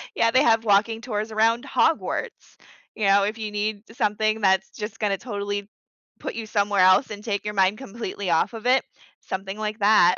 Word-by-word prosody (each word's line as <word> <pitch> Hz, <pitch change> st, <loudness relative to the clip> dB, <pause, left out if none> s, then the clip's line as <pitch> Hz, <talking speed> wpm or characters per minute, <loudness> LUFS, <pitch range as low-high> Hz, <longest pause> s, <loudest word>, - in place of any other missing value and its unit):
Yeah, 230 Hz, 0 st, +3 dB
they 255 Hz, -, +4 dB
have 225 Hz, -2 st, +3 dB
walking 220 Hz, +2 st, +2 dB
tours 215 Hz, -2 st, -3 dB
around 225 Hz, +3 st, +2 dB
Hogwarts. 320 Hz, +3 st, -1 dB, 0.4 s
You 215 Hz, -, -1 dB
know, 195 Hz, 0 st, +5 dB
if 215 Hz, +2 st, -2 dB
you 215 Hz, -2 st, -5 dB
need 210 Hz, 0 st, -2 dB
something 215 Hz, -2 st, 0 dB
that's 190 Hz, -1 st, +2 dB
just 215 Hz, +1 st, -7 dB
gonna 205 Hz, -2 st, 0 dB
totally 205 Hz, -2 st, -4 dB, 0.5 s
put -, -, -5 dB
you 225 Hz, -, -5 dB
somewhere 205 Hz, -2 st, 0 dB
else 185 Hz, +7 st, +5 dB
and 205 Hz, -1 st, -7 dB
take 205 Hz, -2 st, -2 dB
your 210 Hz, -, -4 dB
mind 195 Hz, +1 st, +2 dB
completely 205 Hz, -5 st, -6 dB
off 165 Hz, +7 st, +2 dB
of 225 Hz, 0 st, -8 dB
it, 255 Hz, +2 st, +4 dB, 0.4 s
something 195 Hz, +1 st, -6 dB
like 215 Hz, +1 st, -3 dB
that 200 Hz, -4 st, +5 dB
210 Hz, 190 wpm, -24 LUFS, 200-225 Hz, 0.5 s, know